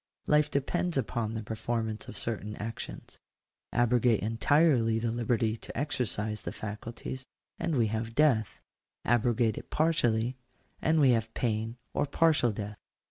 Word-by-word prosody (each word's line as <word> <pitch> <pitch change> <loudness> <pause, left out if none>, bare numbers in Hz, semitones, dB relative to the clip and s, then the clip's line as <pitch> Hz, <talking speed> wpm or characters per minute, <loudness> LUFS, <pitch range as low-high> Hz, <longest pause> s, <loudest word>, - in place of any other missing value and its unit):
Life 150 0 +4
depends 165 +4 0
upon 110 -1 -1
the 110 - -3
performance 110 0 -3
of - - -8
certain 105 -2 -2
actions. 115 +2 -7 0.5
Abrogate 120 -1 +3
entirely 115 +1 +3
the 115 0 0
liberty 115 -1 +1
to - - -9
exercise 115 -6 -1
the - - -4
faculties, 115 +5 -6 0.3
and 170 -2 0
we 120 -4 +3
have 110 +1 -3
death: 130 -9 +3 0.5
abrogate 120 -1 +2
it - - -14
partially, 125 -6 +1 0.4
and 160 0 +3
we 135 -4 +6
have 115 -1 +1
pain 115 0 -1 0.2
or 145 - +1
partial 155 -5 +3
death. 105 0 -6
115 Hz, 135 wpm, -30 LUFS, 110-135 Hz, 0.5 s, we